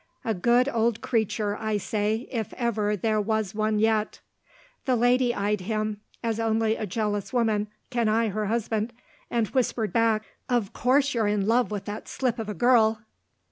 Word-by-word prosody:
A 225 Hz, -, +1 dB
good 240 Hz, +7 st, +3 dB
old 230 Hz, -3 st, +1 dB
creature, 220 Hz, -4 st, 0 dB
I 215 Hz, -1 st, -1 dB
say, 215 Hz, +3 st, -1 dB
if 225 Hz, -5 st, -3 dB
ever 215 Hz, -4 st, 0 dB
there 215 Hz, +2 st, +1 dB
was 215 Hz, -2 st, -1 dB
one 215 Hz, 0 st, 0 dB
yet." 215 Hz, 0 st, +1 dB, 0.7 s
The 260 Hz, -2 st, +2 dB
lady 245 Hz, +1 st, +3 dB
eyed 205 Hz, -2 st, -1 dB
him, 215 Hz, +1 st, -2 dB, 0.2 s
as 230 Hz, -1 st, -1 dB
only 225 Hz, 0 st, +1 dB
a 215 Hz, -, -4 dB
jealous 205 Hz, 0 st, -2 dB
woman 220 Hz, -4 st, +1 dB, 0.2 s
can 235 Hz, -3 st, +1 dB
eye 225 Hz, +1 st, +2 dB
her 210 Hz, +1 st, -2 dB
husband, 225 Hz, +1 st, -1 dB, 0.4 s
and 235 Hz, -2 st, +1 dB
whispered 240 Hz, -4 st, 0 dB
back, 225 Hz, -2 st, +2 dB, 0.3 s
"Of 235 Hz, -4 st, 0 dB
course 270 Hz, +3 st, +2 dB
you're 225 Hz, -3 st, +1 dB
in 205 Hz, -1 st, +1 dB
love 235 Hz, +3 st, +3 dB
with 205 Hz, -2 st, -4 dB
that 210 Hz, +1 st, -6 dB
slip 250 Hz, -3 st, -1 dB
of 220 Hz, -1 st, -4 dB
a 210 Hz, -, -4 dB
girl!" 220 Hz, 0 st, +3 dB
220 Hz, 175 wpm, -26 LUFS, 210-235 Hz, 0.7 s, good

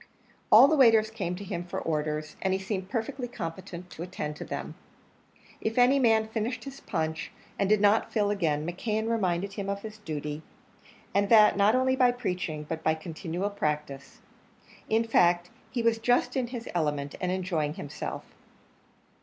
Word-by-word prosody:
All 270 Hz, -, +10 dB
the 315 Hz, -, +3 dB
waiters 225 Hz, -5 st, +5 dB
came 185 Hz, -6 st, -3 dB
to 195 Hz, -, -8 dB
him 180 Hz, -3 st, -4 dB
for 175 Hz, -, -5 dB
orders, 155 Hz, -1 st, -2 dB
and 190 Hz, -1 st, +1 dB
he 190 Hz, -, 0 dB
seemed 190 Hz, -1 st, -4 dB
perfectly 245 Hz, +2 st, -3 dB
competent 180 Hz, -4 st, -7 dB
to -, -, -9 dB
attend 170 Hz, -4 st, -4 dB
to -, -, -6 dB
them. -, -, -5 dB, 0.9 s
If 220 Hz, +2 st, -2 dB
any 250 Hz, +3 st, +5 dB
man 225 Hz, -3 st, +3 dB
finished 225 Hz, +2 st, -3 dB
his 275 Hz, 0 st, -8 dB
punch 160 Hz, -4 st, -3 dB, 0.3 s
and 195 Hz, -, +1 dB
did 215 Hz, 0 st, +4 dB
not 205 Hz, +2 st, +3 dB
fill 205 Hz, -2 st, +1 dB
again, 155 Hz, -7 st, 0 dB
McKeon 215 Hz, +6 st, -2 dB
reminded 195 Hz, -4 st, 0 dB
him 195 Hz, 0 st, -4 dB
of 200 Hz, 0 st, -3 dB
his 215 Hz, -1 st, -8 dB
duty 150 Hz, -4 st, -5 dB, 0.7 s
and 200 Hz, 0 st, +2 dB
that 215 Hz, -2 st, +7 dB
not 205 Hz, +3 st, +4 dB
only 260 Hz, 0 st, +2 dB
by 250 Hz, -1 st, +4 dB
preaching, 180 Hz, -10 st, -3 dB
but 160 Hz, +1 st, -5 dB
by 160 Hz, -, +2 dB
continual 170 Hz, +4 st, -4 dB
practice. 150 Hz, -6 st, -4 dB, 0.7 s
In 225 Hz, +1 st, +3 dB
fact, 175 Hz, -5 st, +3 dB, 0.2 s
he 240 Hz, -3 st, -2 dB
was 230 Hz, -1 st, +2 dB
just 245 Hz, +2 st, +2 dB
in 255 Hz, -2 st, 0 dB
his 240 Hz, -1 st, -7 dB
element, 145 Hz, -4 st, -1 dB
and 180 Hz, -1 st, 0 dB
enjoying 170 Hz, -5 st, -1 dB
himself. 145 Hz, -, -6 dB
195 Hz, 170 wpm, -28 LUFS, 165-225 Hz, 0.9 s, All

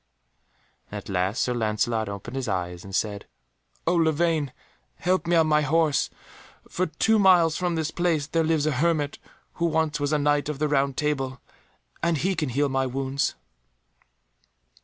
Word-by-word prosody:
And -, -, -6 dB
at -, -, -9 dB
last 95 Hz, +4 st, 0 dB
Sir 125 Hz, -, 0 dB
Lancelot 110 Hz, -1 st, 0 dB
opened 100 Hz, +5 st, -7 dB
his 135 Hz, -2 st, -3 dB
eyes, 90 Hz, -3 st, -3 dB
and 95 Hz, -2 st, -6 dB
said, 105 Hz, -2 st, -2 dB, 0.6 s
"O 170 Hz, -, +2 dB
Lavaine, 160 Hz, -3 st, +1 dB, 0.4 s
help 185 Hz, -1 st, 0 dB
me 175 Hz, -, +3 dB
on 165 Hz, -1 st, +5 dB
my 150 Hz, -1 st, +3 dB
horse, 150 Hz, 0 st, +2 dB, 0.6 s
for 185 Hz, +1 st, -1 dB
two 220 Hz, +8 st, +2 dB
miles 175 Hz, -5 st, +5 dB
from 175 Hz, -1 st, -1 dB
this 160 Hz, -1 st, -1 dB
place 170 Hz, -4 st, 0 dB
there 165 Hz, +2 st, 0 dB
lives 160 Hz, -2 st, +1 dB
a 155 Hz, -, +2 dB
hermit 150 Hz, +1 st, 0 dB, 0.4 s
who -, -, +4 dB
once 160 Hz, -2 st, 0 dB
was 145 Hz, 0 st, -1 dB
a 150 Hz, -, +3 dB
Knight 145 Hz, 0 st, +1 dB
of 150 Hz, -, -3 dB
the 150 Hz, +2 st, 0 dB
Round 140 Hz, -2 st, +1 dB
Table, 135 Hz, -4 st, -1 dB, 0.6 s
and 170 Hz, -1 st, +1 dB
he 190 Hz, +7 st, 0 dB
can 155 Hz, -5 st, -2 dB
heal 140 Hz, +4 st, +1 dB
my 135 Hz, -1 st, 0 dB
wounds." 135 Hz, +2 st, -1 dB
150 Hz, 170 wpm, -25 LUFS, 130-165 Hz, 0.6 s, on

